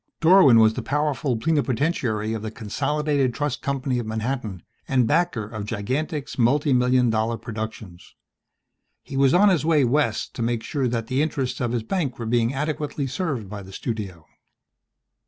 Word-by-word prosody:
Dorwin 165 -7 +7
was 110 -1 +5
the - - -4
powerful 145 -3 -1
plenipotentiary 130 -5 0
of 110 - -4
the 110 - -4
Consolidated 140 +4 -1
Trust 145 -3 -2
Company 135 -2 -1
of 115 - -4
Manhattan 110 -4 -3 0.2
and 130 -3 +2
backer 165 -3 +1
of 105 0 -6
Gigantic's 135 +8 -3
multimillion 125 -1 +3
dollar 110 +1 0
productions. 110 -6 -8 0.9
He 135 - -8
was 135 +1 +4
on 205 +3 +6
his 175 -7 +2
way 155 -3 +3
West 125 -3 0
to - - -6
make 115 -1 -1
sure 135 +1 -1
that 115 -2 -2
the 130 +4 0
interests 135 -5 -2
of 120 -2 0
his 120 -2 -1
bank 145 -4 -2
were 115 - -5
being 115 +1 +1
adequately 145 0 -2
served 135 - -3
by 100 +1 -7
the 95 0 -12
studio. 95 -6 -5
125 Hz, 160 wpm, -23 LUFS, 110-145 Hz, 0.9 s, Dorwin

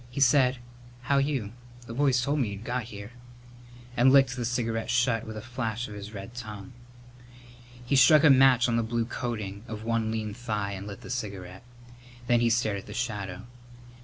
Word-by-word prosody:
He 125 - -6
said, 130 -1 +4 0.4
"How 140 +2 +2
you? 135 -7 -1 0.3
The 115 - -8
boys 135 0 +2
told 145 +3 0
me 120 -6 0
you'd 100 +2 -8
got 125 0 -2
here," 105 -1 -9 0.8
and 130 +2 +5
licked 135 -2 +5
the 120 -2 -3
cigarette 115 -2 -2
shut 120 -2 +1
with 110 -1 -6
a 110 - -7
flash 120 -2 -3
of 105 - -9
his 105 0 -8
red 100 +2 -8
tongue. 110 0 -8 1.1
He 140 - +1
struck 140 +3 +7
a 155 - +8
match 130 -2 +6
on 115 -1 +1
the - - +2
blue 115 +1 -1
coating 110 -4 -5
of 110 -1 -6
one 115 -1 0
lean 110 -2 -3
thigh 105 -3 -3
and 100 +1 -6
lit 100 -2 -8
the - - -8
cigarette, 100 -6 -5 0.6
then 120 -1 +3
stared 110 -3 +1
at - - -13
the - - -8
shadow. 105 -4 -4
115 Hz, 190 wpm, -27 LUFS, 105-125 Hz, 1.1 s, a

